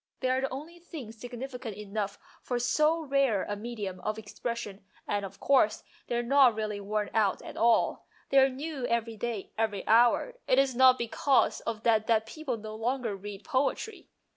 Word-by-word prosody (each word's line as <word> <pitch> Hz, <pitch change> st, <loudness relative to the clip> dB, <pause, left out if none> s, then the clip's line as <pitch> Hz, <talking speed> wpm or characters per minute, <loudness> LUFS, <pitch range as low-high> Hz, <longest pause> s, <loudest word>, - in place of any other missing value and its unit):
They 255 Hz, -, +1 dB
are 260 Hz, +1 st, +1 dB
the 270 Hz, -, -1 dB
only 310 Hz, +6 st, -8 dB
things 265 Hz, -10 st, -9 dB
significant 245 Hz, -3 st, -6 dB
enough 205 Hz, -1 st, -4 dB, 0.2 s
for 245 Hz, -, -2 dB
so 305 Hz, +7 st, +2 dB
rare 275 Hz, -8 st, +2 dB
a 205 Hz, -, -3 dB
medium 205 Hz, -4 st, -5 dB
of 215 Hz, +4 st, -3 dB
expression, 220 Hz, -1 st, -5 dB, 0.2 s
and, 205 Hz, -1 st, -1 dB
of 195 Hz, 0 st, -8 dB
course, 255 Hz, -6 st, +3 dB, 0.2 s
they 240 Hz, -, -2 dB
are 240 Hz, -, 0 dB
not 260 Hz, -2 st, +5 dB
really 215 Hz, -1 st, -3 dB
worn 210 Hz, +1 st, -2 dB
out 210 Hz, -3 st, +1 dB
at -, -, -9 dB
all. 230 Hz, 0 st, +2 dB, 0.2 s
They 275 Hz, -, +6 dB
are 270 Hz, 0 st, +6 dB
new 275 Hz, -1 st, -4 dB
every 230 Hz, -1 st, -1 dB
day, 220 Hz, -2 st, -4 dB
every 210 Hz, -3 st, -1 dB
hour. 240 Hz, -, +4 dB
It 255 Hz, -, +3 dB
is 270 Hz, -1 st, +3 dB
not 255 Hz, 0 st, +7 dB
because 250 Hz, +3 st, +2 dB
of 225 Hz, -1 st, -3 dB
that 220 Hz, -2 st, +3 dB
that 220 Hz, -1 st, +3 dB
people 260 Hz, +1 st, -4 dB
no 215 Hz, 0 st, -8 dB
longer 230 Hz, 0 st, -2 dB
read 200 Hz, +1 st, -8 dB
poetry." 275 Hz, -, -2 dB
235 Hz, 185 wpm, -29 LUFS, 215-265 Hz, 0.2 s, not